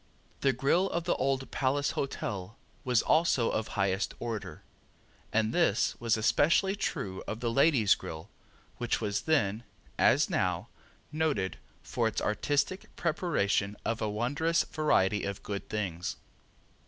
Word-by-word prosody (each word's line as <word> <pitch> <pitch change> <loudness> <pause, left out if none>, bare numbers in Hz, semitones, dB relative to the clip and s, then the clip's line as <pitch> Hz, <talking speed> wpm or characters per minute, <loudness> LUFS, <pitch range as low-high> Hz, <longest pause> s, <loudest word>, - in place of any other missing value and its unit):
The 135 - +3
grill 140 +10 +2
of 170 - -2
the 170 - +1
Old 135 0 -1
Palace 140 +2 +1
Hotel 105 -6 -4 0.3
was 125 -3 +2
also 155 -8 +3
of 110 - -1
highest 95 0 0
order, 110 -9 -5 0.7
and 110 +1 +1
this 170 - +2
was 115 -1 +1
especially 170 - +3
true 95 - -3
of 110 - -4
the 120 -1 -1
Ladies' 130 -5 +4
Grill 80 0 -7 0.5
which 120 -1 0
was 105 -2 -1
then, 115 -9 +1 0.4
as - - +5
now, - - -1 0.4
noted 150 -12 0 0.3
for - - 0
its - - -2
artistic 145 - 0
preparation 105 - 0
of 115 0 -1
a 110 - 0
wondrous 140 +10 +1
variety 105 -10 +1
of 100 0 -4
good 100 -2 -5
things. 90 -5 -3
115 Hz, 135 wpm, -30 LUFS, 100-145 Hz, 0.7 s, as